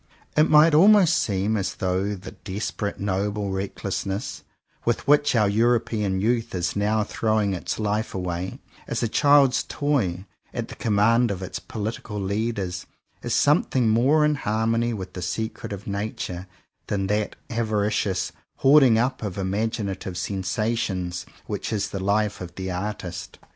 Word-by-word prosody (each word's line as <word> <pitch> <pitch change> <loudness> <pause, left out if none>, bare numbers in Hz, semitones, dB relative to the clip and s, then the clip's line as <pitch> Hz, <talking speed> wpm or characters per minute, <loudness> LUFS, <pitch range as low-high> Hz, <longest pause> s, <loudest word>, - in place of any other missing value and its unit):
It 155 +1 +4
might 155 +1 +7
almost 185 +1 +6
seem 100 +1 0
as 100 -2 -2
though 95 +2 -1
the 95 0 -9
desperate, 100 +1 -4
noble 100 +1 -1
reck 95 +1 -3
lessness, 100 +1 -3 0.4
with 120 -1 -1
which 145 -2 +4
our 105 -3 +4
European 110 -2 +1
youth 115 +1 0
is 90 -1 -1
now 105 +1 +1
throwing 110 -2 0
its 90 - -3
life 105 0 -1
away, 90 0 -3 0.3
as - - -2
a - - +2
child's 140 +1 +4
toy, 110 -12 -1 0.3
at - - -3
the - - -8
command 115 +3 +3
of 95 -2 -3
its 95 - -5
political 110 -1 -5
leaders, 100 -2 -2 0.3
is - - -1
something 135 -5 +3
more 135 +8 +4
in 150 - +3
harmony 115 -2 0
with 95 -5 -6
the 90 - -6
secret 100 +7 -4
of 100 0 -6
Nature, 100 -3 -4 0.4
than 100 -2 -1
that 105 +1 -1 0.2
avaricious 105 -4 0 0.2
hoarding 135 -4 +6
up 130 +3 0
of 100 -4 -4
imaginative 100 -1 -2
sensations 95 -1 -2 0.2
which - - -4
is 105 -3 -1
the 95 -1 -4
life 105 +1 +1
of 90 -1 -8
the 95 0 -4
artist. 90 -2 -5
105 Hz, 150 wpm, -24 LUFS, 95-115 Hz, 0.4 s, might